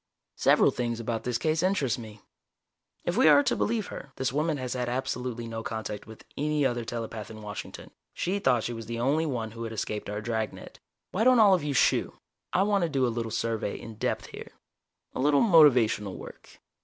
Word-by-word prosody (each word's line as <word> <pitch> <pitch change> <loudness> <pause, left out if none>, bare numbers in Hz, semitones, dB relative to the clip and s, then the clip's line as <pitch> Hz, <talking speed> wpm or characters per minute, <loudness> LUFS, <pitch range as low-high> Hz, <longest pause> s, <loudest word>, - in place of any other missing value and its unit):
"Several - - +4
things 120 -1 -2
about 115 -1 -3
this 125 -2 0
case 155 +3 0
interest 165 - +1
me. 110 -2 -10 0.8
If 175 +4 -1
we 260 - +6
are 285 - +7
to - - +1
believe 220 -2 0
her, 140 - -9
this 130 -1 -2
woman 155 +1 0
has 130 -2 -3
had 125 -1 -2
absolutely 125 -2 -3
no 115 0 -5
contact 110 -2 -5
with 110 0 -13
any 150 0 0
other 120 -2 0
telepath 115 -2 -5
in 110 -1 -10
Washington 105 -1 -8 0.2
she 190 +3 -2
thought 125 - +2
she 120 - -3
was 115 -2 -7
the 115 0 -4
only 145 +6 +1
one 115 -6 -3
who 115 +1 -7
had 115 - -5
escaped 105 -1 -4
our 105 0 -3
dragnet. 110 -1 -4 0.3
Why 205 - 0
don't 255 +1 +6
all 205 -3 +7
of 180 -5 +2
you 145 -2 -2
shoo - - +2 0.3
I 190 - +3
want 200 -1 +2
to 170 - +1
do 135 -3 +1
a 120 - 0
little 115 -1 -3
survey 110 -1 -2
in 115 -2 -10
depth - - -2
here - - -10 0.6
a - - -5
little 145 +1 +4
motivational 125 - +5
work. - - -12
120 Hz, 205 wpm, -28 LUFS, 115-150 Hz, 0.8 s, are